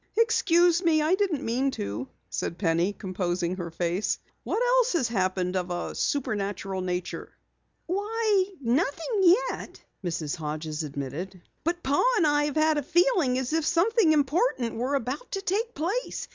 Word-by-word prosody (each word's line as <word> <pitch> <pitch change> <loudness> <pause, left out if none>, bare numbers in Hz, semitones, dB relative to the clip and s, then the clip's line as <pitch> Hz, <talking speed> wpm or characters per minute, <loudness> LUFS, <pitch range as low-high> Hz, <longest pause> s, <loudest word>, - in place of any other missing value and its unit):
"Excuse 350 -6 +4
me, 330 -3 +3
I 315 +4 +2
didn't 375 -8 0
mean 255 +4 +1
to," 105 +6 -4 0.2
said 170 - -3
Penny, 170 +1 +1
composing 180 -3 -2
her 175 -2 -4
face. 175 +4 -1 0.3
"What - - -1
else - - +3
has 275 -9 +2
happened 185 -3 0
of 180 -1 -1
a 175 0 -3
supernatural 200 -7 -2
nature?" 180 -1 -4 0.5
"Why, 410 +1 +1
nothing 310 - 0 0.3
yet," - - -7 0.2
Mrs. 165 -4 -2
Hodges 155 0 -4
admitted. 150 +6 -5 0.2
"But 345 +2 -1
Pa 275 +2 +2 0.2
and 345 - +3
I 295 0 +3
have 295 - -3
had 310 -1 +3
a - - -2
feeling 335 - +2
as 260 +3 -2
if 325 0 +2
something 350 +4 +3
important 290 - +1
were 255 +5 -1
about 275 - -4
to 390 - -1
take 445 +5 -1
place. 395 +11 -2
270 Hz, 155 wpm, -27 LUFS, -, 0.5 s, Excuse